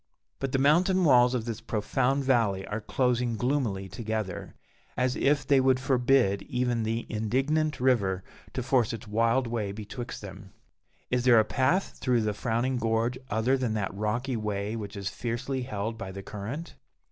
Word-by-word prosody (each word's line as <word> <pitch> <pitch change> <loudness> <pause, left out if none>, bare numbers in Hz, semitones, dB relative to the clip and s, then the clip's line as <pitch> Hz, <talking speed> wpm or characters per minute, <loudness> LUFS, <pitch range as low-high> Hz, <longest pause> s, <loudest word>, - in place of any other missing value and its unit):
But 135 -1 -2
the 135 - +2
mountain 175 +7 +4
walls 125 -4 +5
of 115 -3 -2
this 115 -1 -4
profound 130 +5 0
valley 115 -8 +2
are 105 +1 -4
closing 125 0 0
gloomily 120 -7 -1
together, 110 -3 -4 0.4
as 125 0 +1
if 145 0 +2
they 140 -2 +4
would 130 -1 +3
forbid 125 -6 +2
even 125 -3 0
the 115 +1 -2
indignant 135 +8 0
river 100 -8 +2 0.3
to 130 - -2
force 125 -3 +2
its 115 0 -7
wild 115 +4 +2
way 115 -4 -2
betwixt 110 +3 -7
them. 95 0 -10 0.6
Is 125 -1 +1
there 120 -3 +7
a 110 - +3
path 135 - 0
through 125 -3 +2
the 105 -1 0
frowning 120 +4 -1
gorge 115 +2 0
other 110 +5 +2
than 120 -4 -1
that 100 -3 -2
rocky 115 +6 -1
way 105 -1 -2
which 105 -3 -6
is 100 -1 -4
fiercely 125 +5 -3
held 110 -2 -4
by 95 -4 -5
the 95 +1 -8
current? 110 +13 -6
120 Hz, 170 wpm, -28 LUFS, 105-130 Hz, 0.6 s, there